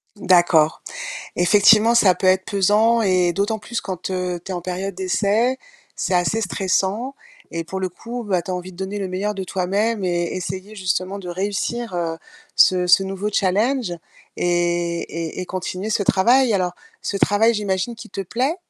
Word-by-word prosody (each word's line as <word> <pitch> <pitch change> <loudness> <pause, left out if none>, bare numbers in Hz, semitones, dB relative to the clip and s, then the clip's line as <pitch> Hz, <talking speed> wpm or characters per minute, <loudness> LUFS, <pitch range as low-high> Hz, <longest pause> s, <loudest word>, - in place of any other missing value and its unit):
D'accord. 175 -5 +3 0.5
Effectivement 210 +5 +5
ça 200 -6 +5
peut 185 - 0
être 185 0 +3
pesant 210 +4 +3
et 185 -4 +2
d'autant 205 +4 -1
plus 235 +2 -4
quand, 185 -1 -5
heu, 180 -1 -2
tu - - -5
es - - -2
en 175 - -4
période 185 +2 -4
d'essai, 210 +7 +1 0.4
c'est - - -1
assez 180 +5 +2
stressant 195 +6 -1 0.4
et 165 0 -3
pour 190 +3 -5
le 185 - -1
coup, 235 +7 -7
bah, 190 -5 0
tu 170 - -11
as 185 - -1
envie 180 +1 -6
de 175 - -16
donner 190 +2 -4
le 195 -2 -3
meilleur 200 +3 -2
de 195 - -4
toi-même 195 +3 -1
et 175 -1 0
essayer 190 +3 -6
justement 185 0 -2
de 185 - -9
réussir, 200 +5 -3
heu, 165 -1 -2 0.4
ce 180 -1 +4
ce 180 +2 +6
nouveau 195 +2 -3
challenge 210 +3 +1 0.4
et 175 -1 0
et 165 +2 -4
et 185 - -5
continuer 185 +2 -4
ce 215 - +1
travail. 235 +6 +4
Alors, 180 -3 +1 0.3
ce 200 - -2
travail 210 +4 +3
j'imagine 205 +1 -2
qu'il 225 0 -11
te 195 - -4
plaît? 250 - -1
190 Hz, 180 wpm, -21 LUFS, 180-210 Hz, 0.5 s, ce